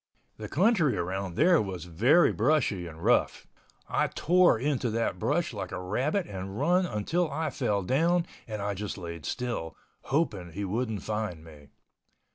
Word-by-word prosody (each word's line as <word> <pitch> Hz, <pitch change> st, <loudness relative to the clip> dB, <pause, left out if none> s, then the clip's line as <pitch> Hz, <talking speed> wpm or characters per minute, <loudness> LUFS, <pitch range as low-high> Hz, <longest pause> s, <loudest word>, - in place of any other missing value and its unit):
The 105 Hz, -1 st, -7 dB
country 175 Hz, -, +3 dB
around 95 Hz, +1 st, -3 dB
there 175 Hz, -, +5 dB
was 95 Hz, -5 st, -5 dB
very 120 Hz, -, +4 dB
brushy 115 Hz, -, +1 dB
and 80 Hz, 0 st, -10 dB
rough. -, -, +2 dB, 0.4 s
I -, -, +1 dB
tore 180 Hz, -4 st, +3 dB
into 130 Hz, -1 st, 0 dB
that 115 Hz, +1 st, -1 dB
brush -, -, 0 dB
like -, -, -5 dB
a -, -, -4 dB
rabbit 130 Hz, -, -1 dB
and 95 Hz, -, -6 dB
run 180 Hz, +5 st, +3 dB
until 160 Hz, -, -1 dB
I 155 Hz, +1 st, -2 dB
fell 100 Hz, -5 st, -1 dB
down 170 Hz, -, +2 dB, 0.2 s
and 105 Hz, -2 st, -4 dB
I 100 Hz, 0 st, -1 dB
just 100 Hz, +1 st, -5 dB
laid 85 Hz, -3 st, -7 dB
still, 120 Hz, -10 st, -3 dB, 0.3 s
hoping 105 Hz, -, -1 dB
he 100 Hz, +3 st, -3 dB
wouldn't 110 Hz, 0 st, -2 dB
find 105 Hz, -7 st, -3 dB
me. 75 Hz, -3 st, -14 dB
110 Hz, 160 wpm, -28 LUFS, 95-150 Hz, 0.4 s, there